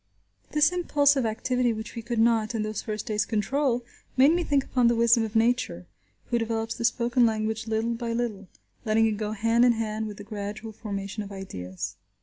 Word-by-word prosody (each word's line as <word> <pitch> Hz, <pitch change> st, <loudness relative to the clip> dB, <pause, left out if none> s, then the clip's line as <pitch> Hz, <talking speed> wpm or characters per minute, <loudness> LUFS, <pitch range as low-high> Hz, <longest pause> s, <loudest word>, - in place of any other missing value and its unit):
This 300 Hz, +2 st, +4 dB
impulsive 285 Hz, -7 st, +2 dB
activity 250 Hz, +2 st, 0 dB
which 220 Hz, 0 st, -7 dB
we 230 Hz, -, -5 dB
could 235 Hz, +1 st, -4 dB
not, 225 Hz, 0 st, +2 dB
in 215 Hz, -, 0 dB
those 215 Hz, -1 st, -3 dB
first 215 Hz, -1 st, -4 dB
days 210 Hz, -1 st, 0 dB
control, 240 Hz, +4 st, 0 dB, 0.3 s
made 270 Hz, +4 st, +7 dB
me 350 Hz, 0 st, +1 dB
think 285 Hz, -4 st, +2 dB
upon 250 Hz, -3 st, +2 dB
the 235 Hz, -, +3 dB
wisdom 235 Hz, 0 st, +4 dB
of 220 Hz, 0 st, -5 dB
Nature, 225 Hz, -, +1 dB, 0.5 s
who 240 Hz, -, +2 dB
develops 225 Hz, 0 st, -2 dB
the 235 Hz, -, -6 dB
spoken 240 Hz, +1 st, +2 dB
language 220 Hz, 0 st, 0 dB
little 225 Hz, +1 st, 0 dB
by 230 Hz, 0 st, -3 dB
little, 230 Hz, -5 st, -3 dB, 0.4 s
letting 225 Hz, 0 st, +3 dB
it 220 Hz, -, +2 dB
go 210 Hz, 0 st, -3 dB
hand 230 Hz, +3 st, +2 dB
in 245 Hz, -1 st, +6 dB
hand 220 Hz, -1 st, -2 dB
with 205 Hz, -2 st, -8 dB
the 205 Hz, -, -8 dB
gradual 210 Hz, +1 st, -6 dB
formation 200 Hz, -1 st, -5 dB
of 205 Hz, -1 st, -7 dB
ideas. 95 Hz, -, -6 dB
225 Hz, 195 wpm, -26 LUFS, 215-240 Hz, 0.5 s, made